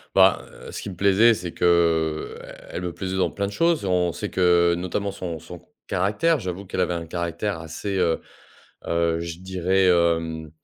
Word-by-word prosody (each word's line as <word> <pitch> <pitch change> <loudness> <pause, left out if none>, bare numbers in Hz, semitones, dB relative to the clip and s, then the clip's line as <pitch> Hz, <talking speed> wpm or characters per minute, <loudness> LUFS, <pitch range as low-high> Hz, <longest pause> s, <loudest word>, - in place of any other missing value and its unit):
Ben, - - +6 0.3
heu, - - -9
ce - - -6
qui 100 - -5
me 90 - -9
plaisait, 100 +4 +5
c'est 90 -3 -6
que 85 -2 +2 0.4
elle 90 - -5
me 90 -1 -3
plaisait 95 +1 -4
dans 95 - +1
plein 100 0 -2
de 100 - -6
choses. 165 -1 +2
On 90 -2 +1
sait - - -5
que, 85 -1 +4
notamment 95 +3 -2
son 85 -4 -5
son 85 +2 -11 0.3
caractère, 125 - +1
j'avoue 95 0 -5
qu'elle 90 - -3
avait 90 -1 +1
un 85 -1 -4
caractère 85 +3 -3
assez, 85 +5 -4
heu 85 -2 +1 0.7
heu, 85 0 +1
je 85 0 -5
dirais, 95 0 +1
hem, 80 -2 +1
90 Hz, 185 wpm, -24 LUFS, 85-95 Hz, 0.7 s, Ben